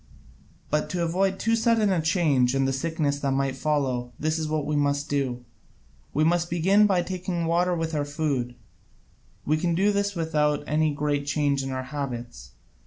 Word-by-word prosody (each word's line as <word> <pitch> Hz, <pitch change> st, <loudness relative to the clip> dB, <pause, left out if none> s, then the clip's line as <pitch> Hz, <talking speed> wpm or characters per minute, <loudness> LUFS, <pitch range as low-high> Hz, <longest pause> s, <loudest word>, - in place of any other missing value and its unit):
But 150 Hz, 0 st, 0 dB
to 175 Hz, -1 st, -1 dB
avoid 190 Hz, +3 st, +1 dB
too 230 Hz, +1 st, +1 dB
sudden 225 Hz, -2 st, +2 dB
a 180 Hz, -3 st, +1 dB
change 150 Hz, -6 st, +2 dB
and 135 Hz, 0 st, +2 dB
the 135 Hz, -, 0 dB
sickness 145 Hz, 0 st, -1 dB
that 140 Hz, -2 st, 0 dB
might 135 Hz, -1 st, 0 dB
follow, 130 Hz, -4 st, -1 dB
this 155 Hz, +1 st, 0 dB
is 155 Hz, -, -2 dB
what 155 Hz, -1 st, -1 dB
we 150 Hz, -, -1 dB
must 145 Hz, 0 st, 0 dB
do. 130 Hz, -4 st, -1 dB, 0.7 s
We 155 Hz, -, +1 dB
must 170 Hz, +1 st, +2 dB
begin 190 Hz, +5 st, +4 dB
by 185 Hz, -3 st, +2 dB
taking 180 Hz, -1 st, -3 dB
water 175 Hz, +2 st, +2 dB
with 165 Hz, -1 st, -3 dB
our 150 Hz, -1 st, 0 dB
food: 145 Hz, -5 st, -2 dB, 0.9 s
we 155 Hz, +2 st, +2 dB
can 170 Hz, +1 st, 0 dB
do 200 Hz, +4 st, +3 dB
this 200 Hz, 0 st, -1 dB
without 150 Hz, -3 st, 0 dB
any 155 Hz, +1 st, +1 dB
great 145 Hz, 0 st, -1 dB
change 145 Hz, -2 st, +1 dB
in 135 Hz, -, -4 dB
our 130 Hz, 0 st, -3 dB
habits. 120 Hz, -, -6 dB
150 Hz, 180 wpm, -25 LUFS, 140-175 Hz, 0.9 s, begin